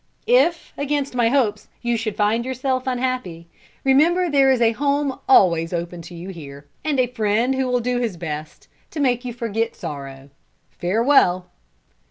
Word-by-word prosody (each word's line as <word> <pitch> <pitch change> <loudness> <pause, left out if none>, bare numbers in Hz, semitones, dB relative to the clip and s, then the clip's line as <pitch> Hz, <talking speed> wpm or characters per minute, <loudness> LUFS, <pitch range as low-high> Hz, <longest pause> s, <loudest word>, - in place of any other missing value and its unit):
If, 435 -9 +2
against 285 -1 -1
my 240 -2 +2
hopes, 220 -6 0 0.2
you 240 0 +1
should 220 -2 -3
find 215 +3 +1
yourself 260 0 -2
unhappy, 250 -10 -3 0.4
remember 330 +6 +3
there 275 -2 +4
is 260 -2 +3
a 230 -1 +4
home 280 +2 -1
always 170 -8 +4
open 170 0 -4
to 170 +1 -11
you 175 +3 -8
here, 145 -5 -10 0.2
and 295 -3 0
a 255 - +4
friend 230 +1 0
who 265 -1 -1
will 250 -1 +1
do 245 +1 -1
his 225 -7 -2
best 155 -1 -7 0.2
to 310 - -7
make 250 -3 +1
you 250 - -4
forget 230 -1 -2
sorrow. 140 -4 -8 0.4
Farewell!" 185 -2 +2
235 Hz, 165 wpm, -21 LUFS, 180-265 Hz, 0.4 s, there